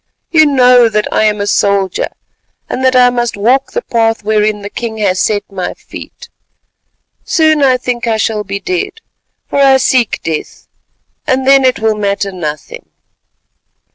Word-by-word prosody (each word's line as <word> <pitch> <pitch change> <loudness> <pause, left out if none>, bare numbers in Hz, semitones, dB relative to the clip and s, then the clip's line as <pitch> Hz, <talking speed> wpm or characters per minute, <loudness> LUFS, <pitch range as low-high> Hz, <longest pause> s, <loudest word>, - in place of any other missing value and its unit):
You 315 -2 +5
know 250 -4 +4
that 210 -1 -1
I 215 - +2
am 210 -1 +1
a 200 - -1
soldier, 200 -2 0 0.6
and 260 - -4
that 260 0 +2
I 250 -1 +5
must 240 -3 -2
walk 250 +6 +1
the 485 - -2
path 225 -2 0
whereon 210 -1 0
the 200 - -6
king 230 -2 -5
has 190 -3 0
set 205 +1 0
my 185 -2 -4
feet. - - -12 1.0
Soon 315 -2 +2
I 260 -2 +4
think 245 -1 -3
I 225 -1 +1
shall 220 -1 -1
be 200 0 -5
dead, 370 - -3 0.5
for - - -2
I 270 -1 +5
seek 255 -3 +1
death, 160 -2 -5 0.6
and 260 0 0
then 275 0 +5
it 255 -1 +2
will 220 0 0
matter 200 -1 -2
nothing." 155 -5 -7
225 Hz, 165 wpm, -13 LUFS, 205-260 Hz, 1.0 s, You